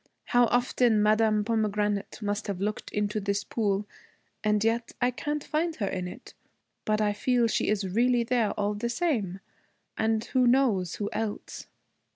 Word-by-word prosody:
How 245 0 +4
often 245 -2 +2
Madame 215 0 +3
Pomegranate 210 -2 -1
must 205 +2 -2
have 195 -3 -3
looked 210 +2 -3
into 210 +1 -1
this 200 0 -1
pool, 205 -2 -1 0.6
and 210 0 +2
yet 230 +1 0
I 245 - +2
can't 295 +4 -3
find 320 +2 -1
her 205 - -2
in 185 -2 -3
it. 180 - -11 0.5
But 215 0 +1
I 210 -1 +2
feel 245 +3 +2
she 225 - 0
is 205 -2 0
really 240 +5 +2
there, 235 -2 +1
all 205 0 -1
the 225 +3 -3
same 235 - -1 0.5
and 220 0 +1
who 255 -2 +2
knows 235 -9 +2
who 205 - -3
else.' 215 -1 -4
215 Hz, 165 wpm, -28 LUFS, 205-240 Hz, 0.6 s, How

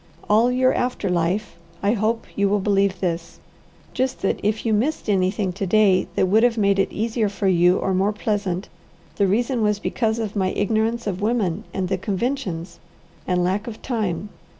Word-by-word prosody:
All 225 +4 +4
your 255 +1 +3
after 245 -5 -1
life 180 +3 -1 0.3
I 200 +2 +3
hope 225 +1 0
you 200 -1 +2
will 205 +1 +2
believe 200 -1 +1
this: 170 -2 -3 0.5
Just 260 0 -2
that 195 - +1
if 210 +3 -1
you 225 - +2
missed 250 +9 0
anything 190 -1 +1
to 195 +1 -3
day 195 -2 +4
that - - +3
would 215 +4 +4
have 240 -1 +3
made 200 -2 +2
it 195 - +1
easier 220 0 -1
for 200 0 -2
you 180 0 +4
or 190 - -1
more 195 +3 +2
pleasant, 205 -3 -2 0.5
the 200 - +3
reason 235 +5 +1
was 210 -1 +2
because 220 +1 -1
of 220 -2 -3
my 190 -2 0
ignorance 220 +3 0
of 195 -2 -3
women 210 -3 0
and 190 -2 -2
the 190 0 -1
conventions, 190 -6 -3 0.5
and 180 -1 +1
lack 195 +5 -1
of 225 -2 -8
time. 205 -6 -2
205 Hz, 185 wpm, -22 LUFS, 185-225 Hz, 0.5 s, All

